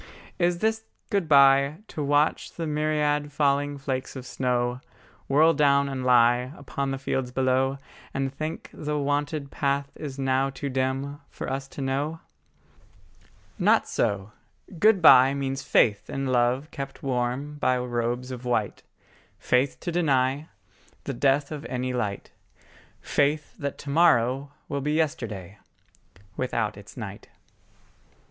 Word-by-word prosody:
Is 175 0 +2
this 220 0 0 0.3
good 195 -6 0
bye, 140 +1 +6
To 155 - -5
watch 145 +2 +1
the 165 - -4
myriad 150 -1 0
falling 145 0 +1
flakes 135 -1 -4
of 130 -1 -7
snow 125 0 -1 0.5
Whirl 155 +4 +5
down 140 -2 +3
and 135 -2 -4
lie 125 0 +4
Upon 140 0 -4
the 135 - -2
fields 130 -1 -2
below; 130 +1 +1 0.3
And 135 0 -2
think 155 +3 -5
the 150 0 -3
wonted 145 0 -1
path 140 0 -1
is 140 -3 -7
now 135 0 +1
too 135 +1 -5
dim 135 +2 -2
For - - -7
us 135 +1 -3
to 140 - -8
know? 140 +4 -2 1.4
Not - - +3
so: 100 0 -1 0.5
good 205 -2 +4
bye 135 -2 +8
Means 135 -1 -2
faith 105 -6 +2
in 135 0 -3
love 130 +3 +1
kept 135 -1 -7
warm 135 +3 -2
by 130 -2 +2
robes 120 +1 -2
of 125 -1 -7
white, 120 -4 -1 0.6
Faith 130 +2 +1
to 175 - -3
deny 140 -3 +1 0.5
The 140 - -4
death 140 +3 +1
of 150 -1 -5
any 125 0 -3
light, 105 -5 -3 0.7
Faith 145 +1 0
that 140 -2 -3
to 140 - -7
morrow 140 -4 +3 0.2
will 140 -1 -3
be 150 +2 -1
yesterday 110 - -2 0.8
Without 115 -4 -1
its 100 +3 -13
night. 100 -4 -8
135 Hz, 140 wpm, -26 LUFS, 125-145 Hz, 1.4 s, bye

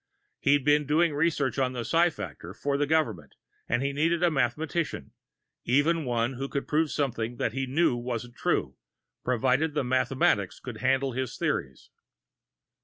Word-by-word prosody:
He'd 140 -1 +3
been 150 -1 +3
doing 160 +2 +3
research 145 -4 0
on 130 -1 +1
the 120 -2 -4
psi 170 +8 +4
factor 160 - -8
for 140 -1 -1
the 145 +1 +1
government, 115 - 0 0.3
and 120 +3 +1
he 140 0 -1
needed 165 +4 +1
a 175 - +4
mathematician 145 - -1 0.5
even 150 +5 +2
one 120 +1 0
who 135 +2 -5
proved 150 +3 0
something 120 -5 -2
which 110 - -1
he 135 0 -2
knew 140 0 +2
wasn't 120 0 -5
true, - - -1 0.5
provided 130 +5 +1
the 150 - +1
mathematics 125 -6 +1
could 120 -3 -7
handle 130 +3 +1
his 130 0 -4
theories. 65 0 -3
135 Hz, 155 wpm, -27 LUFS, 120-150 Hz, 0.5 s, psi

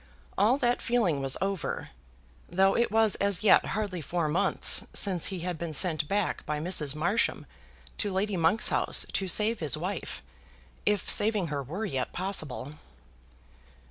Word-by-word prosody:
All 220 +7 +3
that 245 -3 +1
feeling 205 - +1
was 135 -1 0
over, 195 -4 -3 0.6
though 190 +2 +3
it 235 - +2
was 220 -1 +3
as 200 -1 +1
yet 215 - +6
hardly 200 -5 -3
four 170 +1 -1
months 150 +4 +2
since 185 -5 +2
he 190 -3 -5
had 175 -2 -4
been 170 -2 -4
sent 155 -1 +1
back 200 +2 -1
by 150 0 -2
Mrs. 150 -4 -1
Marsham 185 +9 0 0.5
to 205 - -1
Lady 195 +2 -1
Monk's 170 +5 +2
house - - 0
to 190 - -1
save 215 +5 +2
his 155 -1 -2
wife, 180 +3 -5 0.6
if 210 -2 +1
saving 205 -5 +2
her 140 - -2
were 170 - -5
yet 135 -9 -3
possible. 155 -7 -3
185 Hz, 155 wpm, -28 LUFS, 155-205 Hz, 0.6 s, yet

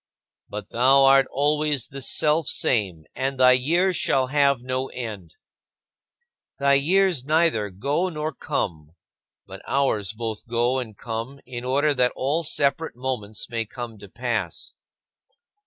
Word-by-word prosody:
But 105 0 -7
"Thou 135 +3 +5
art 135 0 +6
always 150 -1 0
the 135 0 -7
Selfsame 120 - +1
and 135 0 -3
thy 130 0 +7
years 170 +9 +2
shall 130 -1 +1
have 140 -3 +2
no 130 +1 -2
end." 105 -11 -7 1.2
Thy 140 0 +3
years 170 +1 +2
neither 155 -8 +1
go 140 - -1
nor 155 -1 -4
come; 85 - -4 0.5
but - - -10
ours 110 -8 0
both 110 -1 -5
go 120 +2 +1
and 110 -5 -7
come 120 +4 -5
in 120 -1 -7
order 140 +4 +2
that 125 -2 +1
all 145 +6 0
separate 145 0 0
moments 120 -5 -4
may 115 -1 -2
come 115 -1 -8
to 100 -1 -12
pass. 115 -6 -4
130 Hz, 135 wpm, -24 LUFS, 115-145 Hz, 1.2 s, thy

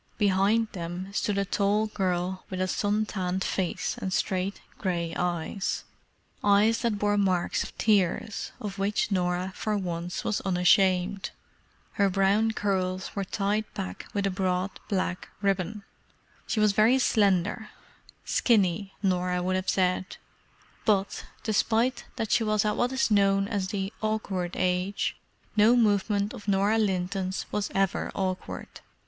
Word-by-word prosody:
Behind 205 +2 +3
them 180 +2 -6
stood 205 -1 0
a 200 - +1
tall 205 +2 +1
girl 185 -3 -2
with 185 - -4
a 185 - +1
sun 205 +3 0
tanned 185 -2 -2
face 185 -3 -2
and 190 - -3
straight 185 +1 -1 0.2
grey 170 -4 -1
eyes—eyes 200 +4 -1
that 230 -4 0
bore 205 0 +1
marks 185 -3 +1
of - - -10
tears, 210 +1 +1
of 205 -4 -6
which 205 +2 0
Norah 180 0 0
for 215 -1 -1
once 175 -2 -3
was 215 - -1
unashamed. 185 +1 +2 0.6
Her 200 -2 +2
brown 195 +3 +3
curls 190 -3 -1
were 200 - -1
tied 205 +3 -1
back 90 -1 -5
with 200 -1 -1
a 195 - +1
broad 185 0 0 0.2
black 185 -3 -2
ribbon. 200 +1 -1 0.6
She 220 - 0
was 215 -1 +5
very 215 +6 +4
slender—"skinny," 205 -1 0
Norah 180 -1 +1
would 185 +1 0
have 185 0 -1
said—but, 190 +2 -2 0.2
despite 230 +3 +1
that 225 -3 -3
she 230 - +4
was 215 0 +1
at 210 - +1
what 245 +1 +1
is 260 -3 +1
known 195 -1 +3
as 200 -3 -1
"the 195 +1 -3
awkward 205 -5 -2
age," 185 +2 0 0.4
no 215 +3 +6
movement 205 -2 +2
of 205 - -10
Norah 200 +3 +3
Linton's 190 -1 -1
was 210 -2 -1
ever 195 -1 0
awkward. 185 -1 -4
195 Hz, 135 wpm, -27 LUFS, 185-210 Hz, 0.6 s, no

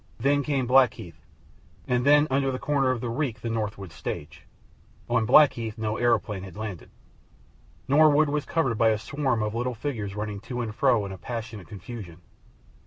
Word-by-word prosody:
Then 145 +1 +2
came 135 -2 -1
Blackheath, 120 - +2 0.7
and 125 -1 +1
then 145 +2 +5
under 135 0 +1
the 130 - -3
corner 140 -1 +1
of 130 -3 -1
the 120 - -3
reek 120 -3 -2
the 115 - -3
Norwood 105 -5 -4
stage. 80 -1 -7 0.6
On 120 -2 +1
Blackheath 125 -5 +4
no 110 -1 -2
aeroplane 110 -5 +1
had 95 -1 -10
landed. 105 -5 -6 1.0
Norwood 150 +1 +5
was 150 0 -1
covered 135 -10 0
by 115 -1 +5
a 110 - +2
swarm 125 0 -1
of 105 0 -2
little 120 +1 -2
figures 110 -6 -4
running 105 -1 -4
to 120 +4 -5
and 110 -3 -4
fro 120 -4 +2
in 100 - -6
a 95 - -8
passionate 115 -4 -6
confusion. 100 -4 -9
115 Hz, 175 wpm, -26 LUFS, 105-135 Hz, 1.0 s, then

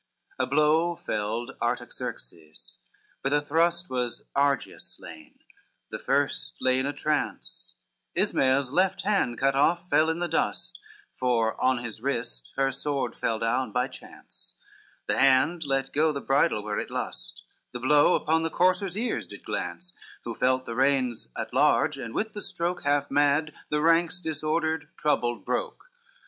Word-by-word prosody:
XXXIV - - +3
A - - -1
blow 155 +4 +3
felled 110 -2 -3
Artaxerxes, 80 +5 -5 0.4
with 135 - +1
a 145 - +4
thrust 170 +4 +1
Was 125 -2 -2
Argeus 140 -2 +1
slain, 80 -1 -12 0.5
the - - -4
first - - 0
lay 130 0 +2
in 130 - 0
a - - 0
trance, 150 0 -3 0.4
Ismael's 130 0 +2
left 185 +4 +1
hand 195 - +1
cut 135 0 +2
off 170 +6 +2
fell 155 +1 +4
in 160 - 0
the 175 0 -1
dust, 165 - -1 0.3
For 115 -3 +1
on 130 -2 +2
his 110 -2 -6
wrist 115 - -3
her 135 0 +2
sword 135 -2 -2
fell 115 - -1
down 120 +3 0
by 125 +1 +1
chance: 130 - -11 0.5
The - - 0
hand 135 +5 +4
let 135 -1 -1
go 155 +2 +3
the 140 - -3
bridle 135 -5 +2
where 105 0 -2
it - - -5
lust, - - -5 0.3
The 125 - -5
blow 145 +6 +5
upon 160 +1 +1
the 165 - -1
courser's 185 +3 +1
ears 240 +3 -2
did - - -12
glance, 180 0 -4 0.3
Who 115 - -4
felt 130 +2 +1
the 115 - -5
reins 130 -2 +1
at - - -4
large, - - +3
and 115 -1 -6
with 220 0 -1
the 210 - -5
stroke 175 -1 -2
Half 145 0 +1
mad, 145 +2 +2 0.2
the 150 0 +1
ranks 165 +1 +3
disordered, 160 -1 -1
troubled, 120 -5 0
broke. - - -3
140 Hz, 160 wpm, -27 LUFS, 125-160 Hz, 0.5 s, blow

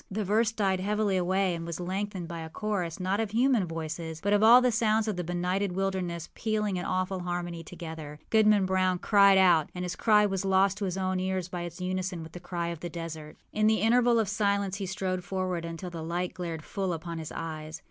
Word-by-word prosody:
The 210 +2 -2
verse 215 +3 +2
died 195 -4 0
heavily 205 +1 0
away, 185 +1 +1
and 165 -1 -4
was 170 0 -5
lengthened 190 0 -3
by 170 -1 -6
a 160 0 -6
chorus, 185 -3 -3
not 190 +2 0
of 225 -2 0
human 235 -3 +2
voices, 160 0 -5
but 200 +4 0
of 205 - +4
all 230 +3 +9
the 250 -1 +2
sounds 220 0 +2
of 215 - -1
the 180 - -3
benighted 180 +3 -1
wilderness 185 -3 -2
pealing 210 -3 -1
in 180 - -3
awful 185 +1 -1
harmony 175 -1 -4
together. 160 -3 -8
Goodman 215 -3 +5
Brown 185 -1 +1
cried 200 0 +5
out, 175 -5 +5
and 180 0 -3
his 180 - -4
cry 210 -2 +4
was 195 -2 -1
lost 195 +1 +3
to 205 - -1
his 185 0 -2
own 185 -1 0
ear 190 0 0
by 175 - -3
its 175 +1 -7
unison 185 -1 -3
with 160 - -10
the 175 - -8
cry 175 -1 -3
of 170 -2 -5
the 175 - -5
desert. 160 -2 -7 0.2
In 215 0 +2
the 220 0 +3
interval 240 +2 +4
of 220 -2 +2
silence 200 -1 0
he 195 -2 -4
stole 185 -1 -2
forward 180 -1 -3
until 165 +2 -6
the 165 -1 -6
light 175 +2 -2
glared 170 -4 -5
full 190 0 -2
upon 165 0 -5
his 160 - -6
eyes. 155 -1 -6
185 Hz, 225 wpm, -28 LUFS, 170-200 Hz, 0.2 s, all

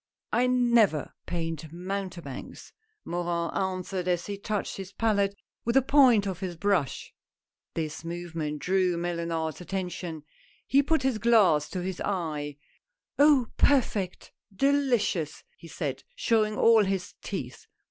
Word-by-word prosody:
" - - -26
I 250 - +3
never 235 - +3
paint 165 -3 -4
mountebanks," 180 -5 -6 0.3
Morin 170 -1 -2
answered 185 -1 -2
as 175 -1 0
he 205 - -4
touched 205 0 -3
his 190 -1 -7
palette 200 -2 +1 0.3
with 235 +2 0
the 270 - +6
point 255 -7 +5
of 190 -3 -3
his 180 -3 -5
brush. 180 -7 0 0.6
This 155 -1 -3
movement 165 -3 -4
drew 180 +1 +1
Mellunard's 170 -2 -2
attention. 180 -4 -4 0.4
He 275 - +4
put 290 0 +1
his 260 -5 +1
glass 200 -10 +4
to 180 -2 -4
his 185 -1 -4
eye. 155 -7 -3 0.3
" - - -42
Oh! 285 -5 +5
perfect 215 -9 +1
— 205 - -27
delicious! 245 - +1
" - - -37
he - - -11
said, - - -4
showing 220 - +2
all 225 -2 +6
his 190 -2 -2
teeth. - - -6
190 Hz, 140 wpm, -28 LUFS, 170-225 Hz, 0.6 s, the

